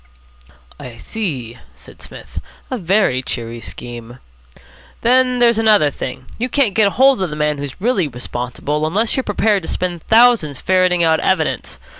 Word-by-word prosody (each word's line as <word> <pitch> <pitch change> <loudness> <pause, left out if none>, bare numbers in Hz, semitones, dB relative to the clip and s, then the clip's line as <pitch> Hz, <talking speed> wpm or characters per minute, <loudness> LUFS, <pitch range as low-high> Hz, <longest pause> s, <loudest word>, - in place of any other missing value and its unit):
"I 120 -2 -10
see," 130 - -5 0.2
said - - -16
Psmith. - - -10 0.3
"A 255 - -2
very 180 -8 +1
cheery 115 -2 -5
scheme." 120 0 -9 0.8
"Then 250 +1 +3
there's 235 -2 +3
another 210 -9 +4
thing. 130 -1 -7
You 250 +2 -2
can't 255 -6 +1
get 210 -3 +3
hold 265 -3 +4
of 185 - -1
the 150 - -6
man 150 -1 -1
who's 140 -2 -7
really 205 -5 +1
responsible, 125 +4 -3
unless 215 +8 0
you're 265 - +1
prepared 205 -1 +1
to 160 - -5
spend 175 -2 -3
thousands 225 - +3
ferreting 185 -2 +2
out 160 -1 +3
evidence. - - -1
180 Hz, 155 wpm, -18 LUFS, 135-225 Hz, 0.8 s, another